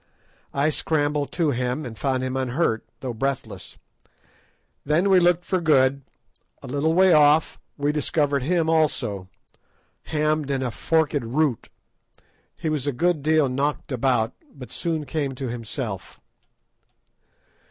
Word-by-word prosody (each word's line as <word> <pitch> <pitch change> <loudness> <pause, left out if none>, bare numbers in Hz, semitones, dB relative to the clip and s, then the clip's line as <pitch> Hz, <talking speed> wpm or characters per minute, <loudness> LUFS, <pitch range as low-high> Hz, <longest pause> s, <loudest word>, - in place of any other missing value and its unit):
I 145 +3 +1
scrambled 145 -2 0
to 165 -4 +1
him, 125 +3 -2
and 115 -2 -7
found 130 +4 -1
him 130 0 -3
unhurt, 130 -2 0 0.2
though 130 -2 -4
breathless. 135 +3 -4 1.1
Then 170 +7 +2
we 185 - +7
looked 175 0 +2
for 185 -2 0
Good. 140 -4 +3 0.6
A - - -8
little 145 +5 0
way 185 -1 +6
off 150 +1 +4 0.2
we 145 0 +1
discovered 145 -1 0
him 165 +4 +1
also, 130 - 0 0.8
hammed 155 -1 0
in 135 -1 -1
a 125 - -2
forked 160 +4 +1
root. 130 +2 -1 0.9
He 165 - -5
was 150 -3 -1
a - - +2
good 165 +3 0
deal 155 0 +3
knocked 140 +3 -2
about, 125 -3 +1 0.2
but 125 -4 -11
soon 160 -3 -2
came 140 -1 -2
to 130 -1 -4
himself. 115 -5 -5
145 Hz, 135 wpm, -24 LUFS, 130-155 Hz, 1.1 s, we